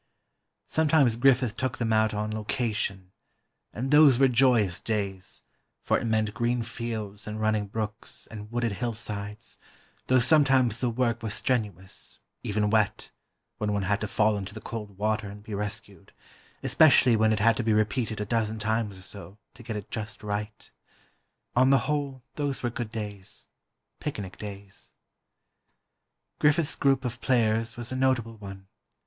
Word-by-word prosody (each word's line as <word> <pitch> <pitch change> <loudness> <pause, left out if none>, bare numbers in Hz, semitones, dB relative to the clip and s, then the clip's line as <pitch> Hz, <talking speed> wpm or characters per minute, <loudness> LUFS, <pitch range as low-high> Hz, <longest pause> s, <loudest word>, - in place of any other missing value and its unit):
Sometimes 155 -7 +3
Griffith 125 -2 +3
took 130 0 -2
them 115 -2 0
out 110 0 +3
"on 105 0 -2
location," 105 -4 -2 0.6
and 130 +5 -3
those 150 -4 +7
were 135 +1 +6
joyous 120 -7 +3
days, 100 -4 -4 0.4
for - - +1
it - - -4
meant 110 -2 +1
green 120 +1 0
fields 110 -3 -5
and 105 0 -4
running 110 -1 +1
brooks, 110 +1 -4
and 105 0 -8
wooded 120 -1 0
hillsides, 105 -1 -5 0.5
though 130 - +4
sometimes 130 -3 +4
the 125 - +2
work 120 0 0
was 110 -2 -2
strenuous, 105 -7 -2 0.2
even 105 0 0
wet, 110 -2 +1 0.5
when 105 -1 0
one 100 -1 0
had 100 +2 0
to 110 - -1
fall 105 +1 +2
into 100 +2 -7
the - - -6
cold 105 -3 -7
water 105 0 0
and 105 +1 -10
be 110 - -8
rescued, 100 -1 -5 0.5
especially 130 -6 +6
when 110 0 +3
it 110 - +2
had 115 +1 +4
to 120 - -2
be 110 - +1
repeated 110 +1 0
a 105 - -2
dozen 110 0 0
times 110 -2 -1
or 95 - -12
so, 100 0 -9 0.2
to - - -14
get 115 -2 -5
it 105 -2 -7
just 105 -1 -6
right. 105 +1 -4 0.8
On 130 +2 +5
the 135 -4 +4
whole, 140 -4 -2
those 140 -4 -3
were 120 - 0
good 120 -2 -4
days—picnic 105 +1 -7
days. 100 -1 -9 1.5
Griffith's 150 +1 +3
group 135 -2 +2
of 120 0 -4
players 115 -2 +1
was 120 0 -6
a - - -2
notable 125 -4 +1
one. 95 -2 -10
110 Hz, 155 wpm, -27 LUFS, 105-120 Hz, 1.5 s, those